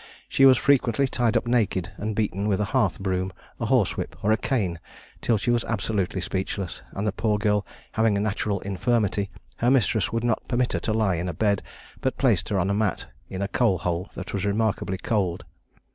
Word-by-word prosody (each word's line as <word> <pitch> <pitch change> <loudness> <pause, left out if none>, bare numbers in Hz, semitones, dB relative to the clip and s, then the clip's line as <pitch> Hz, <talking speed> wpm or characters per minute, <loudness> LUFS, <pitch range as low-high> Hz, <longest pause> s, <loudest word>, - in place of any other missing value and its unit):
She 135 - +5
was 130 -2 +7
frequently 135 -1 +3
tied 120 -2 +1
up 115 - -1
naked 110 -7 +1
and 105 +1 -3
beaten 105 -1 -1
with 100 -3 +1
a 105 - +1
hearth 120 -9 +2
broom, 95 -1 -1 0.3
a - - -1
horsewhip, - - +1
or 105 - +3
a - - +6
cane, 100 -9 -1 0.4
till 115 - +2
she 120 - 0
was 120 -1 +2
absolutely 100 -4 -1
speechless; 95 0 -3
and 100 - -3
the 105 - +2
poor 105 +1 0
girl 105 -1 +1 0.2
having 110 -2 +2
a - - +1
natural 105 -1 -1
infirmity, 100 0 0 0.3
her 120 - +2
mistress 115 -6 +2
would 115 0 -1
not 120 -2 0
permit 125 0 +1
her - - 0
to 110 - -1
lie 105 -5 +2
in 90 +2 -2
a 85 - -5
bed, 100 +1 +2 0.4
but - - -1
placed - - +2
her 100 - +1
on 95 +2 +1
a - - +2
mat 105 -2 0 0.2
in 95 +1 -3
a - - 0
coal 110 -3 +2
hole 90 +2 -2
that - - -6
was 100 -1 -1
remarkably 105 -2 0
cold. 95 -3 -1
105 Hz, 205 wpm, -25 LUFS, 95-115 Hz, 0.4 s, was